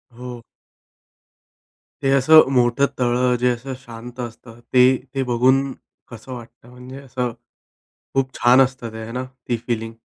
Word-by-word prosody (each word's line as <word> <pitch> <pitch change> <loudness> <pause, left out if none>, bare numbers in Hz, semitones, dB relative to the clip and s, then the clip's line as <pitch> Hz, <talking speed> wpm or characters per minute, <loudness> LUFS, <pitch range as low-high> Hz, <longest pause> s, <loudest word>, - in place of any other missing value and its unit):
हो. 125 -1 -8 1.6
ते 135 - +2
असं 140 +2 +6
मोठं 125 +2 +3
तळं, 125 0 +2
जे 125 0 +3
असं 130 +3 -5
शांत 120 +1 -11
असतं, 120 0 -8
ते 130 +1 +6 0.2
ते 135 - +1
बघून 130 +3 +3 0.4
कसं 120 +2 -10
वाटतं? 120 0 -12
म्हणजे 125 +2 -11
असं 125 -2 -3 0.8
खूप 135 -1 0
छान 125 +2 +5
असतं, 130 -3 -1
ते - - -7
आहे 115 +1 -7
ना, 125 +1 -3 0.2
ती 120 -2 0
फीलिंग? 115 -1 -2
125 Hz, 145 wpm, -21 LUFS, 120-130 Hz, 1.6 s, असं